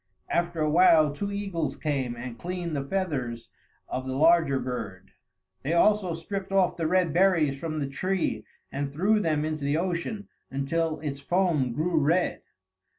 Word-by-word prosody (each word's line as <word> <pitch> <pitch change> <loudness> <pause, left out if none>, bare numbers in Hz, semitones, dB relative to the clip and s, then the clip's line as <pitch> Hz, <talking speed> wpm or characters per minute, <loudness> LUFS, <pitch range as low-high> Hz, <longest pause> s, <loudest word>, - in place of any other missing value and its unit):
After 170 -1 0
a 155 - +2
while 155 -3 +5
two 200 +7 -4
eagles 195 -6 -2
came 135 -5 -2
and 120 0 -7
cleaned 175 -2 -4
the 140 - -1
feathers 135 -9 -3 0.4
of 130 +1 -4
the 130 - -3
larger 160 -1 +4
bird. 105 -7 -6 0.5
They 150 - -1
also 185 -1 +3
stripped 195 +4 -5
off 195 -2 +3
the 165 -2 -1
red 180 -2 +2
berries 170 -7 +3
from 155 -1 -3
the 145 - -1
tree 185 +7 -1 0.3
and 140 0 -3
threw 195 +9 +2
them 155 -6 0
into 155 -2 -3
the 145 +2 +1
ocean 185 +4 -3 0.2
until 155 +4 -1
its 140 -3 -4
foam 160 -5 +1
grew 160 +6 +1
red. 165 +5 +1
160 Hz, 160 wpm, -27 LUFS, 140-180 Hz, 0.5 s, while